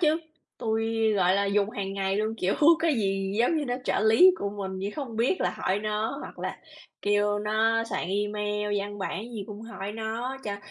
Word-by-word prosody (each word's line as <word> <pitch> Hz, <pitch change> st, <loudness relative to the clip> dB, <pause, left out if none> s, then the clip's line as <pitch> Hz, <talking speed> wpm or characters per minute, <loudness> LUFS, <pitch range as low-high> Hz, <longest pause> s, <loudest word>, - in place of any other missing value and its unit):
chứ. 315 Hz, -2 st, +3 dB, 0.4 s
Tui, 225 Hz, 0 st, +1 dB
gọi 185 Hz, -2 st, +3 dB
là, 200 Hz, 0 st, +2 dB
dùng 200 Hz, +1 st, +1 dB
hàng 195 Hz, -2 st, -4 dB
ngày 195 Hz, 0 st, 0 dB
luôn, 215 Hz, +1 st, 0 dB
kiểu, 195 Hz, -3 st, 0 dB, 0.2 s
cái 320 Hz, -2 st, +2 dB
gì 195 Hz, -3 st, 0 dB
giống 245 Hz, +8 st, +3 dB
như 300 Hz, -, 0 dB
nó 245 Hz, -, -1 dB
trợ -, -, +1 dB
lý 225 Hz, -, +7 dB
của 200 Hz, -, -2 dB
mình 195 Hz, -2 st, -5 dB
như 195 Hz, +2 st, -3 dB
không 255 Hz, -6 st, -5 dB
biết 245 Hz, +11 st, +1 dB
là -, -, +2 dB
hỏi 190 Hz, +2 st, 0 dB
nó. 215 Hz, +5 st, -2 dB
Hoặc -, -, -9 dB
là -, -, -4 dB, 0.4 s
kêu 205 Hz, 0 st, +2 dB
nó 220 Hz, +2 st, +2 dB
soạn 230 Hz, -, -3 dB
email, 210 Hz, +1 st, -1 dB
văn 205 Hz, +1 st, -6 dB
bản 195 Hz, +1 st, -3 dB
gì 210 Hz, -4 st, -5 dB
cũng 210 Hz, 0 st, -8 dB
hỏi 210 Hz, -3 st, -6 dB
nó 225 Hz, +4 st, -3 dB
cho 205 Hz, -1 st, -3 dB
210 Hz, 205 wpm, -27 LUFS, 200-225 Hz, 0.4 s, lý